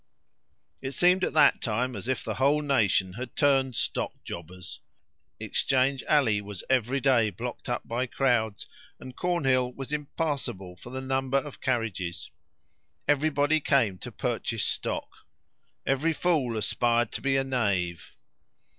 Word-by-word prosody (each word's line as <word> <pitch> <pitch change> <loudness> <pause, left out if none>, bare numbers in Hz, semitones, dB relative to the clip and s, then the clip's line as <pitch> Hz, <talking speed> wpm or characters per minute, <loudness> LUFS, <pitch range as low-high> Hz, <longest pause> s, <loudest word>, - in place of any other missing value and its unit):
It 135 +1 -4
seemed 180 +3 +4
at - - 0
that 150 -3 +5
time 120 +3 -1
as - - -5
if 130 - -1
the - - -3
whole 145 +3 +2
nation 105 -9 +2
had 125 +3 -7
turned 135 -3 +3
stockjobbers. 90 -1 -4 0.6
Exchange 135 0 +1
Alley 120 -9 +3
was 100 -2 -7
every 130 +1 +2
day 125 -5 +3
blocked 120 +7 -6
up 120 - -2
by 120 +3 -1
crowds, 120 -5 0 0.3
and 130 -1 -10
Cornhill 135 -8 +1
was 135 +3 -7
impassable 140 - -3
for 120 - -12
the 130 +1 -5
number 130 0 0
of 140 0 -5
carriages. 110 -9 -2 0.8
Every 145 +2 +3
body 145 +2 +2
came 120 -11 +2
to - - -8
purchase - - -2
stock. - - -2 0.8
"Every 145 +5 +1
fool 145 -9 +1
aspired 120 +2 +1
to - - -4
be 135 -1 +2
a 135 - +2
knave." 95 -10 -1
130 Hz, 140 wpm, -27 LUFS, 110-140 Hz, 0.8 s, that